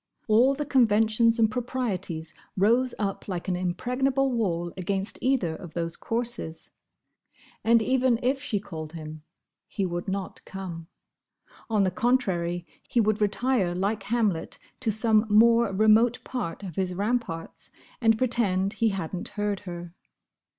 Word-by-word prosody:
All 240 +5 +5
the 295 +1 -3
conventions 230 -2 +3
and 220 -2 +3
proprieties 195 -10 -3 0.2
rose 235 +6 +3
up 200 -2 -3
like 180 -3 -4
an 185 - 0
impregnable 250 +10 0
wall 175 -8 -1
against 195 +2 -3
either 245 -11 +1
of 170 0 -11
those 165 -1 -2
courses. 230 -8 -3 0.9
And 230 0 +4
even 255 -1 +2
if 265 +2 +1
she 215 -8 -1
called 160 -5 -8
him, 155 -1 -8 0.5
he 195 - -2
would 175 0 -4
not 195 0 -4
come. 175 -4 -7 0.8
On 215 -3 +3
the 185 - +1
contrary, 180 -6 0 0.2
he 240 - +2
would 215 -1 +2
retire 210 -3 +1
like 200 +3 -1
Hamlet 210 -6 -1 0.2
to 230 -4 0
some 220 0 +2
more 230 +1 +5
remote 220 +4 +4
part 205 -8 -4
of 180 -5 -7
his 185 -2 -1
ramparts, 205 -5 -3 0.3
and 225 -1 +4
pretend 210 -6 +2
he 230 - +2
had 190 -3 -3
n't 175 - -5
heard 205 -2 -2
her. 175 -1 -7
210 Hz, 145 wpm, -26 LUFS, 180-235 Hz, 0.9 s, All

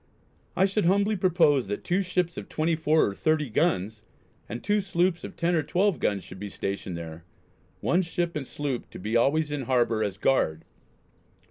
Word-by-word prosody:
I 190 - +4
should 200 0 0
humbly 200 +4 +3
propose 165 - +3
that 105 +1 -4
two 180 +3 +1
ships 180 -2 -1
of - - -7
24 160 0 +2
or - - -5
30 150 +2 0
guns 110 - 0 0.5
and 120 +2 -6
2 210 0 +2
sloops 180 -2 0
of - - -7
10 170 +1 0
or 165 - +3
12 185 +5 +1
guns 100 -2 0
should 95 - -11
be 100 +1 -5
stationed 95 -2 -4
there, 80 0 -8 0.6
one 175 - +2
ship 170 -1 -2
and 140 -4 -4
sloop 140 -4 -4
to - - -10
be 105 +5 -3
always 145 +6 +2
in 145 -3 -3
harbour 120 -4 +2
as 100 -3 -3
guard." 80 -12 +1
155 Hz, 180 wpm, -27 LUFS, 110-175 Hz, 0.6 s, I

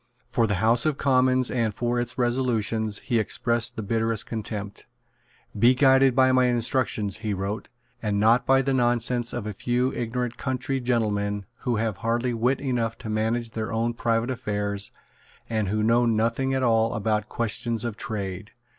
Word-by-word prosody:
For 115 -1 +2
the 100 - 0
House 115 - +2
of 150 -3 0
Commons 130 -2 +2
and 115 -4 0
for 120 0 0
its 120 +1 -3
resolutions 115 -4 0
he 120 -3 +1
expressed 115 +1 -1
the 110 - -4
bitterest 115 +1 0
contempt. 105 -2 -6 0.7
"Be 120 +4 +5
guided 135 -1 +5
by 130 0 +5
my 130 0 +4
instructions," 115 -4 0
he 110 -2 -3
wrote, 100 +3 -4 0.3
"and 105 -2 -1
not 115 +4 +4
by 135 0 +4
the 135 0 0
nonsense 120 -1 +1
of 120 -4 -4
a 105 - -4
few 125 +5 0
ignorant 120 0 -3
country 130 0 -2
gentlemen 105 -4 -1 0.2
who 120 - +1
have 110 -2 -1
hardly 120 +3 -1
wit 120 +4 +1
enough 120 -4 -1
to 115 -4 -6
manage 115 +2 -1
their 110 0 -4
own 115 +1 0
private 115 +1 0
affairs, 100 -4 -3 0.6
and 110 -3 -1
who 105 +2 0
know 120 +2 +3
nothing 115 +4 +1
at 130 - 0
all 115 -1 +2
about 105 0 -1
questions 115 0 -1
of 115 -3 -3
trade." 100 -2 -5
115 Hz, 170 wpm, -25 LUFS, 110-125 Hz, 0.7 s, Be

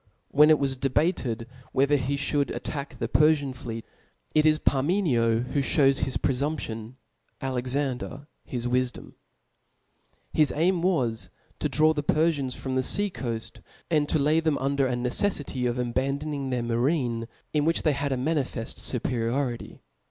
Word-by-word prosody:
When 150 +2 +6
it 155 - +6
was 135 -2 0
debated, 130 -3 0 0.3
whether 140 +2 +3
he 140 0 0
Ihould 145 0 0
attack 140 -3 -5
the 115 - -2
Perfian 145 +1 +3
fleet 115 -2 -7 0.3
(*), - - -36
it 155 0 +4
is 155 0 +4
Parmenio 135 - +2
that 125 - -8
(hews 135 0 +3
hia 130 - -1
pre - - +1
C) 125 - -2
Ibid. 155 +2 0
fumption, 115 -4 -6 0.5
Alexander 130 +1 -2 0.2
his 120 -2 -4
wifdom« 125 0 -1 1.2
His 155 -2 +3
aim 170 +3 +2
was 130 -12 +1 0.3
to - - 0
draw 155 +1 +4
the 150 - -1
Perfians 145 -4 +1
from 130 0 -4
the 130 - +2
fea«coaft, 125 - -1 0.3
and 150 -2 +2
to - - +3
lay 150 +2 +3
them 160 -3 +1
under 135 0 +1
a 125 - -1
neceiBty 125 0 0
of 120 - -3
abandoning 135 +3 -2
their 125 -2 -1
marine, 120 -1 0 0.3
in 150 -1 +2
which 165 +1 +1
th^ 155 - +4
had 140 0 -2
a 130 - 0
manifeft 130 -4 -2
fuperiority. 120 0 -2
135 Hz, 160 wpm, -26 LUFS, 125-150 Hz, 1.2 s, When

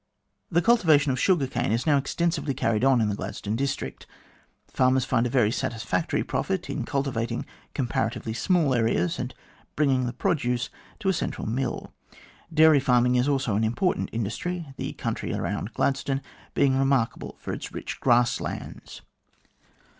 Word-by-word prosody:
The 170 -1 +2
cultivation 160 - +4
of 130 - -1
the - - -1
sugar 175 -8 +3
cane 120 -2 -1
is 115 +2 0
now 150 -3 +4
extensively 150 0 -1
carried 115 0 0
on 135 -3 +5
in 110 - +2
the - - 0
Gladstone 105 +1 -4
district. 135 +2 -3 0.6
Farmers 130 0 +2
find 120 -2 +1
a - - -3
very 120 -4 +3
satisfactory 120 +7 -1
profit 190 -2 -2
in 130 - -3
cultivating 125 -5 -2 0.3
comparatively 115 -3 -1
small 160 +2 +2
areas, 115 -8 +1
and - - -3 0.4
bringing 135 -4 +2
the 120 - -3
produce 125 -6 0 0.3
to 195 - +1
a - - +3
central 160 - -3
mill. 130 +4 -3 0.6
Dairy 160 -2 +6
farming 125 -2 +3
is 125 +2 +2
also 135 -7 +1
an 110 - +1
important 120 - 0
industry, 135 - -3
the - - -4
country - - -3
around - - -3
Gladstone 135 0 0 0.3
being 135 -1 +3
remarkable 135 -4 0
for - - -5
its - - -6
rich - - -6
grass 120 -1 +3
lands. - - -7
130 Hz, 155 wpm, -26 LUFS, 120-145 Hz, 0.6 s, Dairy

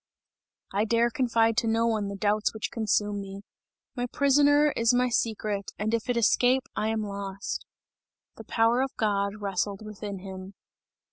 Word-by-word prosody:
"I 205 +2 +1
dare 235 +1 +2
confide 230 -2 +2
to 235 - +2
none 225 -2 +1
the 200 - -5
doubts 210 +2 0
which 220 - -4
consume 210 -2 0
me! 195 0 -8 0.5
My 245 0 -2
prisoner 290 +3 +4
is 230 -1 +2
my 250 0 +2
secret 215 -4 -1
and 215 +2 -2
if 230 +1 -1
it 245 - +1
escape 250 +3 +3
I 215 - 0
am 220 -1 -1
lost!" 200 -1 -5 0.7
The - - -10
power 230 +2 +2
of 265 0 -2
God, 200 -2 0
wrestled 200 +1 -2
within 205 -1 -6
him. 190 +1 -9
220 Hz, 155 wpm, -27 LUFS, 200-235 Hz, 0.7 s, prisoner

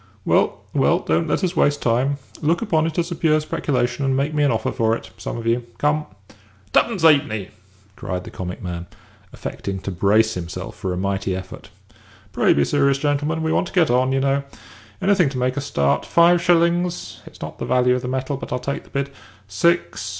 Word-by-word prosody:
"Well, - - +2
well, - - +3
don't 80 +1 0
let - - 0
us 180 -1 0
waste 145 0 +2
time. 130 +4 +1 0.2
Look 165 +7 +1
upon 160 -7 +1
it 160 - -5
as 175 0 -1
a - - -2
pure 155 -1 +3
speculation, 140 -4 -1
and 135 -1 +1
make 145 +3 0
me 150 - +1
an 145 - +4
offer 110 -1 -1
for 115 0 +1
it, - - -9
some - - -5
of 115 - -6
you. 120 +1 +1
Come." 150 +1 0 0.7
"Tuppence 210 -8 +2
'ap'ny!" 140 - +3 0.5
cried 90 -2 -4
the - - -10
comic 90 -1 -6
man, 85 -1 -5 0.4
affecting 95 -1 -5
to 100 - -4
brace 105 +5 +3
himself 90 +1 -6
for 95 - -4
a 90 - -2
mighty 100 0 -1
effort. 95 0 -8 0.6
"Pray - - +3
be 70 0 +3
serious, 140 -1 +2
gentlemen. 145 +3 -1
We 160 - 0
want - - +1
to - - -11
get 170 -7 +3
on, 130 +1 +2
you 135 - +1
know. 140 +1 +1 0.6
Anything 190 -6 +4
to 135 - -6
make 125 0 0
a 145 - -2
start. 70 - 0
Five 170 +1 +4
shillings? 175 0 +1
It's - - -14
not - - -7
the - - -3
value 125 0 +3
of 125 - -1
the 125 - -5
metal, 130 +2 -2
but - - -8
I'll 125 - 0
take 140 +3 -4
the - - -19
bid. 140 0 -2 0.4
Six. 170 - 0
135 Hz, 210 wpm, -21 LUFS, 110-155 Hz, 0.7 s, an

